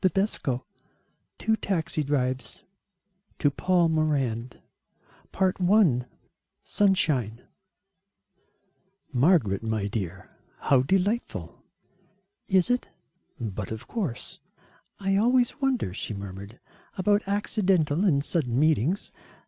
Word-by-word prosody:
XIV 185 Hz, -, 0 dB, 0.7 s
TWO 220 Hz, 0 st, +1 dB
TAXI 165 Hz, -6 st, -1 dB
DRIVES 130 Hz, -4 st, -2 dB, 0.7 s
[To 145 Hz, -, +2 dB
PAUL 180 Hz, +2 st, +2 dB
MORAND] 135 Hz, -7 st, -1 dB, 0.8 s
I: 185 Hz, -, +3 dB, 0.6 s
SUNSHINE 150 Hz, -, +1 dB, 1.7 s
"Margaret, 125 Hz, -, +3 dB
my 110 Hz, -2 st, -2 dB
dear, 95 Hz, -3 st, -5 dB, 0.3 s
how 135 Hz, -3 st, +3 dB
delightful." 195 Hz, -, -1 dB, 0.9 s
"Is 190 Hz, +3 st, +3 dB
it?" 245 Hz, -, -2 dB, 0.4 s
"But 105 Hz, -4 st, -5 dB
of 110 Hz, +2 st, -6 dB
course." 180 Hz, -, -4 dB, 0.6 s
"I 195 Hz, 0 st, +1 dB
always 245 Hz, +5 st, +2 dB
wonder," 260 Hz, -, 0 dB
she 105 Hz, +2 st, -4 dB
murmured, 100 Hz, +3 st, -8 dB, 0.4 s
"about 205 Hz, +1 st, +2 dB
accidental 190 Hz, -5 st, +1 dB
and 145 Hz, -8 st, +2 dB
sudden 130 Hz, -8 st, 0 dB
meetings. 155 Hz, -, +1 dB
155 Hz, 90 wpm, -26 LUFS, 120-195 Hz, 1.7 s, I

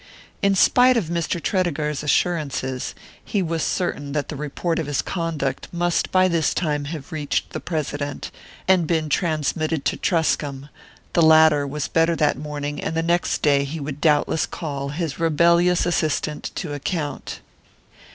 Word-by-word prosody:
In 200 Hz, 0 st, +3 dB
spite 250 Hz, +6 st, +5 dB
of 185 Hz, -8 st, -1 dB
Mr. 170 Hz, 0 st, -1 dB
Tredegar's 155 Hz, -6 st, -1 dB
assurances, 145 Hz, -5 st, -1 dB, 0.3 s
he 200 Hz, -3 st, -1 dB
was 165 Hz, -1 st, -2 dB
certain 145 Hz, -6 st, -2 dB
that 150 Hz, -1 st, -2 dB
the 155 Hz, -, -4 dB
report 150 Hz, +4 st, -2 dB
of 160 Hz, -, -3 dB
his 145 Hz, -2 st, 0 dB
conduct 160 Hz, -7 st, -2 dB
must 175 Hz, 0 st, 0 dB
by 185 Hz, 0 st, +4 dB
this 165 Hz, -3 st, +1 dB
time 150 Hz, -4 st, -1 dB
have 150 Hz, +2 st, -7 dB
reached 150 Hz, -3 st, -2 dB
the -, -, -4 dB
President, 145 Hz, -3 st, -4 dB, 0.4 s
and 185 Hz, -4 st, +4 dB
been 160 Hz, -2 st, 0 dB
transmitted 155 Hz, -1 st, 0 dB
to -, -, 0 dB
Truscomb; 145 Hz, -5 st, 0 dB, 0.4 s
the 170 Hz, -, +3 dB
latter 160 Hz, -2 st, +6 dB
was 145 Hz, +1 st, -3 dB
better 165 Hz, +1 st, +2 dB
that 150 Hz, -2 st, +2 dB
morning, 145 Hz, 0 st, -5 dB
and 160 Hz, -, -2 dB
the 165 Hz, -, +1 dB
next 170 Hz, +1 st, 0 dB
day 140 Hz, -2 st, +4 dB
he 145 Hz, +4 st, -5 dB
would 145 Hz, 0 st, -6 dB
doubtless 150 Hz, 0 st, +2 dB
call 140 Hz, -4 st, -4 dB
his 155 Hz, 0 st, -4 dB
rebellious 170 Hz, +2 st, +3 dB
assistant 155 Hz, -3 st, -1 dB
to 160 Hz, -5 st, -4 dB
account. 145 Hz, +1 st, -4 dB
155 Hz, 155 wpm, -22 LUFS, 145-170 Hz, 0.4 s, latter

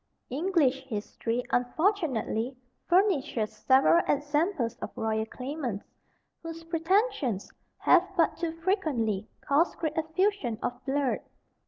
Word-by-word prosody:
English 285 Hz, -3 st, +1 dB
history, 230 Hz, +1 st, -3 dB
unfortunately, 255 Hz, -, 0 dB, 0.3 s
furnishes 305 Hz, -, +2 dB
several 265 Hz, +9 st, +5 dB
examples 290 Hz, -, 0 dB
of -, -, -5 dB
royal 220 Hz, 0 st, -1 dB
claimants, 255 Hz, -5 st, -4 dB, 0.6 s
whose 330 Hz, 0 st, -7 dB
pretensions 330 Hz, -, 0 dB, 0.3 s
have 360 Hz, +1 st, +4 dB
but 330 Hz, -2 st, +3 dB
too 335 Hz, -1 st, -2 dB
frequently 240 Hz, -, 0 dB
caused 300 Hz, +5 st, +2 dB
great 315 Hz, -1 st, -2 dB
effusion 320 Hz, -, 0 dB
of 245 Hz, +1 st, -3 dB
blood. 275 Hz, -1 st, +1 dB
290 Hz, 105 wpm, -28 LUFS, 240-335 Hz, 0.6 s, several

